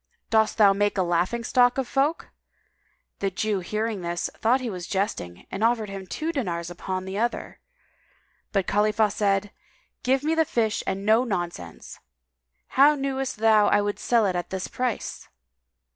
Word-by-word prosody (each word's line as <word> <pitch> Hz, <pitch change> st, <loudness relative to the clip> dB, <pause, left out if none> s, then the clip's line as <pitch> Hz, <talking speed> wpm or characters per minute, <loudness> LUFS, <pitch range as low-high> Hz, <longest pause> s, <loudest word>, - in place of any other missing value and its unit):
Dost 220 Hz, -1 st, +3 dB
thou 205 Hz, -3 st, +6 dB
make 205 Hz, +1 st, 0 dB
a 190 Hz, -, +3 dB
laughing 175 Hz, +7 st, 0 dB
stock 245 Hz, +2 st, +3 dB
of 265 Hz, -2 st, -1 dB
folk?" 280 Hz, +6 st, 0 dB, 0.9 s
The 195 Hz, -, 0 dB
Jew 205 Hz, +1 st, -1 dB
hearing 215 Hz, +2 st, -3 dB
this 175 Hz, 0 st, -3 dB
thought 240 Hz, +4 st, +2 dB
he 255 Hz, -, -4 dB
was 180 Hz, -5 st, -5 dB
jesting 190 Hz, -, -3 dB
and 195 Hz, -, -3 dB
offered 225 Hz, -3 st, +1 dB
him 195 Hz, -1 st, -7 dB
two 315 Hz, -, -3 dB
dinars 175 Hz, -, -3 dB
upon 185 Hz, +1 st, -4 dB
the 190 Hz, +2 st, -4 dB
other, 235 Hz, +1 st, -2 dB, 0.9 s
but 195 Hz, -3 st, +1 dB
Khalifah 210 Hz, +1 st, +2 dB
said, 200 Hz, -1 st, 0 dB, 0.5 s
"Give 265 Hz, +2 st, +1 dB
me 315 Hz, +2 st, +1 dB
the 325 Hz, 0 st, +3 dB
fish 225 Hz, -7 st, -1 dB
and 195 Hz, +1 st, -2 dB
no 220 Hz, +3 st, +4 dB
nonsense. 175 Hz, -, -5 dB, 0.7 s
How 285 Hz, +3 st, +5 dB
knewest 270 Hz, -3 st, -2 dB
thou 215 Hz, -1 st, +4 dB
I -, -, +4 dB
would 205 Hz, 0 st, -2 dB
sell 235 Hz, -3 st, +2 dB
it 185 Hz, -2 st, 0 dB
at 175 Hz, -, -3 dB
this 190 Hz, -1 st, -4 dB
price?" 250 Hz, -3 st, -3 dB
210 Hz, 165 wpm, -25 LUFS, 190-240 Hz, 0.9 s, thou